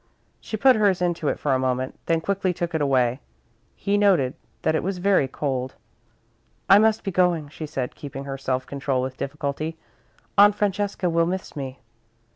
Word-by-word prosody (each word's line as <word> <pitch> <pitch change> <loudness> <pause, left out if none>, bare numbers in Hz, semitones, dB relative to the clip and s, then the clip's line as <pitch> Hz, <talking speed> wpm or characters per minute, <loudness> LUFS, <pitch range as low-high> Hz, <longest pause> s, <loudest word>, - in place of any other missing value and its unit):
She 220 - -5
put 260 +3 +6
hers 200 -4 +3
into 175 -3 -1
it - - 0
for 140 - 0
a 130 - +2
moment, 130 0 -2
then 165 -1 +2
quickly 190 0 -1
took 175 0 -3
it 160 - 0
away. 130 -3 +2 0.6
He 205 +1 0
noted 180 -11 +3 0.3
that - - +2
it 160 - +1
was 190 +1 -2
very 185 -6 +3
cold. 130 -1 -3 0.9
"I 200 - +8
must 220 0 +3
be 195 - -2
going," 175 -5 +1
she 155 +1 -7
said, 135 -4 -3
keeping 140 -1 -7
her 140 -1 -5
self 130 -1 -2
control 135 -2 -2
with 130 0 -4
difficulty, 150 +3 -4 0.6
"Aunt 205 0 +7
Francesca 205 -2 -1
will 165 -1 +2
miss 185 +1 -4
me." 135 -2 -5
160 Hz, 180 wpm, -24 LUFS, 135-190 Hz, 0.9 s, I